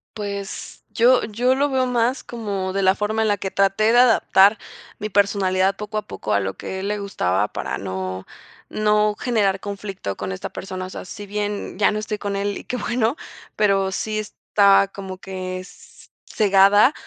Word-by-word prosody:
Pues, 200 Hz, -1 st, -6 dB
yo 245 Hz, +2 st, +4 dB
yo 245 Hz, +4 st, +1 dB
lo 285 Hz, +1 st, +1 dB
veo 260 Hz, -1 st, +1 dB
más 245 Hz, +1 st, 0 dB
como 200 Hz, -5 st, -4 dB
de 195 Hz, -, 0 dB
la 190 Hz, +1 st, +4 dB
forma 215 Hz, +1 st, -1 dB
en 220 Hz, -, +2 dB
la 205 Hz, -1 st, +2 dB
que 190 Hz, +1 st, -4 dB
traté 195 Hz, +3 st, +2 dB
de 240 Hz, -, +6 dB
adaptar 215 Hz, -4 st, +5 dB, 0.4 s
mi 210 Hz, -, -4 dB
personalidad 195 Hz, -1 st, +2 dB
poco 210 Hz, +1 st, -5 dB
a 215 Hz, -, 0 dB
poco, 95 Hz, -, -4 dB
a 100 Hz, -, +3 dB
lo 95 Hz, 0 st, -3 dB
que -, -, -9 dB
a 190 Hz, -, -4 dB
él 195 Hz, -, -3 dB
le 210 Hz, 0 st, -1 dB
gustaba, 105 Hz, -, 0 dB
para -, -, -4 dB
no 95 Hz, 0 st, -5 dB, 0.4 s
no 210 Hz, 0 st, +2 dB
generar 205 Hz, -6 st, +1 dB
conflicto 195 Hz, -, -5 dB
con 100 Hz, -1 st, -4 dB
esta 95 Hz, -, -5 dB
persona. 185 Hz, -1 st, -6 dB
O -, -, -8 dB
sea, -, -, -8 dB
si 205 Hz, +3 st, -8 dB
bien 205 Hz, -1 st, -4 dB
ya 205 Hz, -, +4 dB
no 210 Hz, -, -2 dB
estoy 215 Hz, 0 st, -4 dB
con 200 Hz, -1 st, -3 dB
él 200 Hz, 0 st, -2 dB
y -, -, -9 dB
qué 250 Hz, -, -3 dB
bueno, 240 Hz, +2 st, 0 dB, 0.4 s
pero 195 Hz, -2 st, +2 dB
sí 215 Hz, +2 st, -2 dB
está 200 Hz, -1 st, +3 dB
como 190 Hz, -2 st, -7 dB
que 185 Hz, -1 st, -5 dB
s 185 Hz, -, -15 dB, 0.2 s
cegada 205 Hz, +5 st, +5 dB
200 Hz, 195 wpm, -22 LUFS, 190-215 Hz, 0.4 s, de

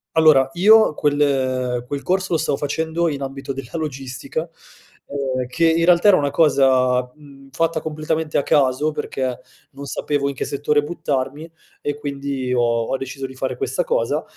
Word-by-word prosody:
Allora, 155 Hz, -5 st, +6 dB
io 215 Hz, +2 st, +6 dB
quel 130 Hz, -4 st, 0 dB
quel 140 Hz, +1 st, -4 dB
corso 190 Hz, 0 st, 0 dB
lo -, -, +3 dB
stavo 145 Hz, -, 0 dB
facendo 160 Hz, +4 st, -1 dB
in 140 Hz, -2 st, -4 dB
ambito 135 Hz, 0 st, -5 dB
della 135 Hz, -2 st, -7 dB
logistica, 140 Hz, 0 st, -4 dB, 0.6 s
ehm, 130 Hz, -3 st, -2 dB
che, 165 Hz, +6 st, +1 dB
in 165 Hz, +1 st, +3 dB
realtà, 175 Hz, +3 st, +5 dB
era 190 Hz, -, +6 dB
una 145 Hz, -1 st, 0 dB
cosa, 130 Hz, -4 st, +3 dB
mhmm, 140 Hz, -2 st, -16 dB
fatta 160 Hz, +4 st, -1 dB
completamente 155 Hz, 0 st, -2 dB
a -, -, +2 dB
caso 140 Hz, +2 st, +2 dB
perché 130 Hz, -4 st, -3 dB, 0.3 s
non 140 Hz, +1 st, -9 dB
sapevo 140 Hz, +1 st, -1 dB
in 140 Hz, -, -5 dB
che -, -, -3 dB
settore 145 Hz, +1 st, 0 dB
buttarmi 145 Hz, 0 st, -3 dB, 0.3 s
e 145 Hz, -, -2 dB
quindi 140 Hz, -3 st, -4 dB
ho 125 Hz, -, +2 dB
ho 115 Hz, +1 st, 0 dB
deciso 135 Hz, +1 st, -6 dB
di 130 Hz, -, -7 dB
fare 130 Hz, 0 st, -4 dB
questa 430 Hz, +4 st, -1 dB
cosa, -, -, 0 dB
140 Hz, 165 wpm, -21 LUFS, 130-160 Hz, 0.6 s, Allora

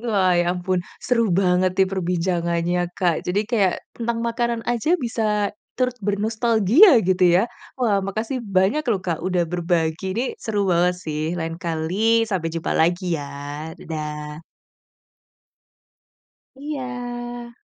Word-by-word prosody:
Wah, 200 Hz, -6 st, +2 dB
ya 175 Hz, -, +1 dB
ampun, 180 Hz, 0 st, -1 dB, 0.3 s
seru 230 Hz, -3 st, +2 dB
banget 185 Hz, 0 st, +3 dB
nih 190 Hz, -, +5 dB
perbincangannya 175 Hz, -1 st, 0 dB, 0.2 s
Kak. 175 Hz, -3 st, +2 dB
Jadi, 190 Hz, +3 st, +2 dB
kayak, 200 Hz, -7 st, +3 dB, 0.2 s
tentang 235 Hz, 0 st, -2 dB
makanan 235 Hz, 0 st, -1 dB
aja 240 Hz, +9 st, +1 dB
bisa 215 Hz, -, -1 dB, 0.2 s
turut 250 Hz, -1 st, 0 dB
bernostalgia, 220 Hz, -, +4 dB
gitu 185 Hz, 0 st, +1 dB, 0.2 s
ya. 195 Hz, -, +3 dB, 0.3 s
Wah, 220 Hz, -6 st, +2 dB
makasih 220 Hz, +6 st, -3 dB
banyak 200 Hz, +6 st, +1 dB
loh 210 Hz, -5 st, +2 dB
Kak, 170 Hz, -3 st, -2 dB
udah 180 Hz, -1 st, 0 dB
berbagi, 170 Hz, -1 st, -1 dB
ini 235 Hz, -, +1 dB, 0.2 s
seru 205 Hz, -3 st, -1 dB
banget 180 Hz, +1 st, +3 dB
sih, 155 Hz, -1 st, -3 dB, 0.2 s
lain 165 Hz, 0 st, -3 dB
kali 185 Hz, +8 st, +1 dB
sampai 180 Hz, -5 st, -1 dB
jumpa 165 Hz, 0 st, -2 dB
lagi 175 Hz, +3 st, +2 dB, 0.2 s
ya, 140 Hz, 0 st, -7 dB, 0.5 s
dadah. 150 Hz, -1 st, -6 dB, 2.1 s
Iya. 245 Hz, -4 st, -6 dB
195 Hz, 125 wpm, -22 LUFS, 175-235 Hz, 2.1 s, nih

